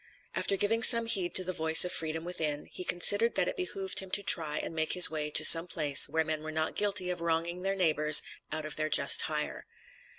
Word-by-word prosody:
After 195 - -4
giving 225 +4 -3
some 230 -1 +6
heed 190 -6 -2
to 185 - 0
the 185 0 -7
voice 160 +1 +4
of 180 - -6
freedom 160 0 -6
within, 155 -4 -5
he - - -11
considered 205 +6 +1
that 180 - -2
it - - -6
behooved 190 +1 -6
him 190 - -9
to 205 - -13
try 155 -5 +2
and - - -7
make 160 -1 -3
his 180 -2 +5
way 150 -1 -5
to 155 +1 +4
some 165 +2 +6
place 150 -5 +3
where 160 0 -3
men 155 -1 -6
were 155 0 -10
not 155 0 -5
guilty 200 -3 -3
of 175 -1 -9
wronging 170 +1 -5
their 195 +1 -4
neighbors 155 -4 +2 0.3
out 155 0 -6
of 155 - -6
their 155 0 -5
just 140 -2 +4
hire. 150 -1 -6
165 Hz, 230 wpm, -26 LUFS, 155-185 Hz, 0.3 s, some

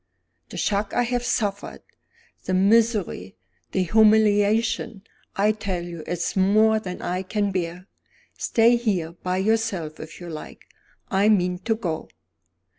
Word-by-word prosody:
The - - -8
shock 205 0 -1
I 245 - +3
have 245 0 -1
suffered, 205 -5 -2 0.6
the 185 - 0
misery, 200 - +2 0.4
the 190 - +1
humiliation 215 +1 +3 0.3
I 205 +2 +3
tell 200 -5 -4
you 170 -2 -8
it's 175 -1 -2
more 215 +3 +4
than 180 -4 -7
I 180 +1 -2
can 205 +1 -1
bear. 180 -1 -4 0.5
Stay 235 +1 +3
here 195 -9 -1
by 180 +2 -3
yourself 195 -6 -1
if 155 0 -10
you 175 - -9
like; 155 -2 -9 0.5
I 200 +2 +3
mean 180 -4 +2
to 225 - +2
go." 170 -8 -4
200 Hz, 135 wpm, -24 LUFS, 180-220 Hz, 0.6 s, more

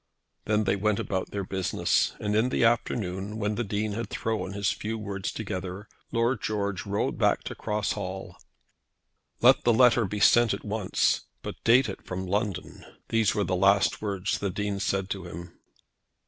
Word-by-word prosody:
Then 105 +1 +2
they 100 - +2
went 105 +1 +1
on - - -2
about 95 -2 -2
their 100 -1 -3
business, 95 -1 0
and 105 0 -1
in 110 +4 +3
the - - +1
afternoon, 105 -3 0
when 105 -1 -1
the 120 - -1
Dean 105 0 -2
had 115 +3 -4
thrown 110 -4 -2
his 100 0 0
few 110 +1 -4
words 100 -3 -4
together, 95 -1 -5 0.2
Lord 115 0 +1
George 100 -3 -2
rode 100 +1 -1
back - - +2
to - - -5
Cross 105 0 -2
Hall. 95 -2 -5 1.1
"Let - - +6
the 120 - +4
letter 120 0 +5
be 105 +2 -4
sent 120 0 +5
at - - -11
once, 105 -2 0 0.2
but - - -7
date 125 +2 +5
it 95 - -6
from 95 +1 -4
London." 100 0 -3 0.3
These 115 -1 +2
were 105 - +1
the 90 - 0
last 100 +2 +3
words 100 -2 -1
the 100 - -1
Dean 100 +1 -2
said 95 -1 0
to 95 -3 -4
him. 85 0 -9
105 Hz, 180 wpm, -27 LUFS, 95-110 Hz, 1.1 s, Let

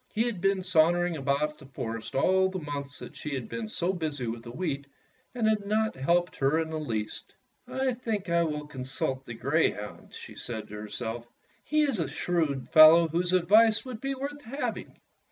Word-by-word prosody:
He 220 - +3
had 235 -7 -3
been 195 -1 +2
sauntering 175 0 +3
about 145 +1 -1
the 135 - -13
forest 115 -4 -6
all 190 +7 +3
the 190 - -4
months 145 -3 -5
that - - -10
she 150 -2 -4
had 130 -3 -4
been 230 -1 -4
so 185 -3 -1
busy 155 -7 -3
with 115 0 -4
the 120 - -10
wheat 140 0 -3 0.5
and 230 -3 +1
had 215 -2 +2
not 220 +2 +1
helped 170 +7 +1
her 135 +3 +2
in 160 -1 -2
the 160 - -2
least. 110 -8 -4 0.3
"I 260 -1 0
think 225 -5 -3
I 170 0 +2
will 150 -2 -2
con 135 -3 -7
sult 130 0 -3
the 120 - -6
greyhound," 125 -5 -1
she - - -9
said 110 -3 -6
to - - -11
herself. 115 +3 -5 0.4
"He 305 0 +2
is 275 -9 +1
a 165 - 0
shrewd 150 -2 -1
fellow 160 +1 +8
whose 175 +3 0
advice 215 +6 +5
would 250 -4 -7
be 275 0 -2
worth 285 +2 -5
having." 275 +3 -5
165 Hz, 195 wpm, -28 LUFS, 135-200 Hz, 0.5 s, fellow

